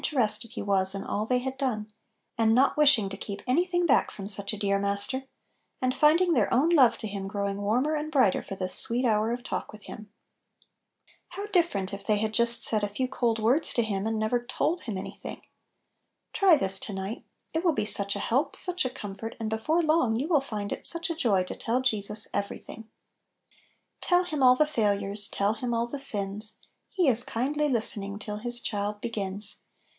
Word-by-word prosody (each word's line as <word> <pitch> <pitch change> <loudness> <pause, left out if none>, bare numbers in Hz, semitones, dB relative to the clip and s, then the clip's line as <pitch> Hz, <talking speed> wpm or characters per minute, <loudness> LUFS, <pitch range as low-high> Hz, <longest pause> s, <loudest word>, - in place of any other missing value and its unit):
terested 230 -5 0
He - - -5
was 195 -1 +5
in 195 - -4
all 210 +2 -3
they 250 - +2
had 260 +1 -4
done, 215 -6 -3 0.4
and 225 -1 +3
not 260 +2 +3
wishing 285 -9 +4
to 195 - -7
keep 200 0 -7
any 260 +8 +2
thing 355 -1 0
back 280 - +3
from 195 -1 -8
such 200 -1 -2
a 215 - -5
dear 200 -1 0
Master, 200 +7 -2 0.5
and 255 0 0
finding 330 +5 +4
their 230 -9 +1
own 270 +7 +3
love 275 -9 +5
to 220 - -5
Him 200 -1 -5
growing 200 0 -3
warmer 245 +9 +1
and 305 0 -3
brighter 255 -10 +3
for 195 - -8
this 185 -1 -3
sweet 245 +2 -1
hour 220 -1 +1
of 240 +1 -4
talk - - -4
with 215 -1 -13
Him! 215 -1 -11 1.2
How 405 - -6
different 330 - 0
if 200 0 -6
they 210 0 +1
had 215 +1 -2
just 235 +1 +1
said 215 -2 +2
a 205 - 0
few 255 +6 -2
cold 235 -3 0
words 240 +8 +2
to 235 - +2
Him, 205 -1 -2
and 225 0 -1
never 220 +3 0
told 310 +7 -1
Him 215 -6 -5
any 185 - -6
thing! - - -9 0.9
Try 380 -4 +5
this 190 -7 0
to 205 - -4
night 195 +5 -5 0.3
1 320 - -1
It - - -17
will 345 - +4
be 210 - -1
such 200 -1 +1
a - - -3
help, 260 +6 0
such 360 -1 +2
a 255 - -1
comfort, 210 -1 -7
and 220 -1 -3
before 310 +10 0
long 305 -8 +2
you 285 - -2
will 315 -5 +3
find 210 -7 -5
it - - -3
such 335 0 +1
a - - -3
joy 205 - +2
to 180 - -7
tell 235 +3 -1
Jesus 215 -4 +3
every 200 - -2
thing 225 - -11 0.7
I - - -32 0.5
"Tell 355 0 +2
Him 310 -5 -4
all 250 -1 +7
the 305 - +3
failures, 205 -6 -1
Tell 200 +2 0
Him 240 0 -3
all 230 0 0
the 275 +4 -5
sins; 210 -4 +1 0.3
He 365 -5 0
is 240 -2 +7
kindly 290 +7 -1
listening 205 -5 -1
Till 210 0 -6
His 240 +2 -1
child 205 0 -3
begins. 205 -2 -4
225 Hz, 215 wpm, -27 LUFS, 205-270 Hz, 1.2 s, all